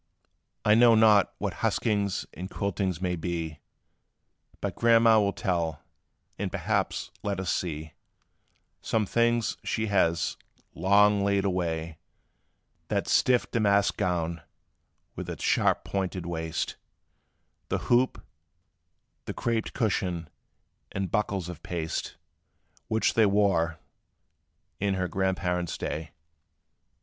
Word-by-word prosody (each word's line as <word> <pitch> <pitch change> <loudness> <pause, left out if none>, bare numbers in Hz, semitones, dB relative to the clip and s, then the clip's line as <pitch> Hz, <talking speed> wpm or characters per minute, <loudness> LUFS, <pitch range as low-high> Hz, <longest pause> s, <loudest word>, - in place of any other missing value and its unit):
"I 105 - +6
know 115 +1 +7
not 110 -2 +5
what - - -3
huskings 100 -3 0
and 95 +3 -7
quiltings 95 -4 -2
may 90 -1 0
be; 80 -2 -4 1.0
But - - -3
Grandma' 115 -1 +5
will 100 -1 +2
tell; 85 -6 -2 0.6
and - - -2
perhaps - - -1
let 100 -2 -2
us 95 -2 -1
see 80 -3 -4 0.9
Some 110 -2 0
things, 120 +2 +1
she 110 - -1
has, 85 -4 +2 0.4
long 100 +1 +4
laid 100 0 +1
away: 85 -4 -2 0.9
That - - -1
stiff 125 -1 +3
damask 100 -3 +3
gown, 85 -2 -1 0.7
with - - -6
its - - -6
sharp - - +2
pointed 95 -2 -3
waist, 80 -2 -3 0.9
The - - +1
hoop, 125 +2 +2 1.0
the - - -5
craped 115 -2 -1
cushion, 90 -6 -1 0.6
and 95 -3 -3
buckles 100 -4 -1
of 90 -3 -8
paste, 80 -2 -4 0.7
Which 110 0 +1
they 110 -2 +5
wore 95 -5 +2 1.0
in 100 -1 +1
her 95 -1 -1
grandparents' 90 -2 -1
day. 80 0 -4
95 Hz, 110 wpm, -28 LUFS, 85-105 Hz, 1.0 s, know